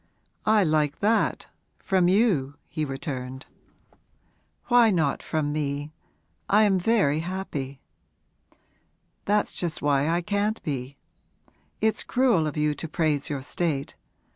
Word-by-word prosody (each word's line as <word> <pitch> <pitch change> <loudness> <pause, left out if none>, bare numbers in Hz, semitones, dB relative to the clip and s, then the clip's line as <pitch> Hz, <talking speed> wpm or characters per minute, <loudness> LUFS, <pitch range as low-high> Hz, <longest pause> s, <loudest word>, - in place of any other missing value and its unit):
'I 215 -1 +5
like 155 -3 +1
that 220 +3 +1 0.3
from 185 -3 +1
you!' 180 - +2
he 155 0 -3
returned. 130 -1 -5 1.2
'Why 240 -2 +5
not 160 -8 +1
from 150 -2 -2
me? 145 0 -3 0.6
I 210 +2 +5
am 195 -3 +3
very 175 -8 +2
happy.' 160 -7 -5 1.5
'That's 210 +1 +1
just 170 -3 -3
why 145 +1 +2
I 170 +1 +1
can't 205 +4 -1
be. 135 -2 -4 0.8
It's 220 0 +2
cruel 240 -11 +2
of 150 - -5
you 150 0 +2
to 155 +3 -6
praise 155 -3 0
your 140 -3 -3
state. 145 -2 -2
155 Hz, 120 wpm, -26 LUFS, 145-200 Hz, 1.5 s, I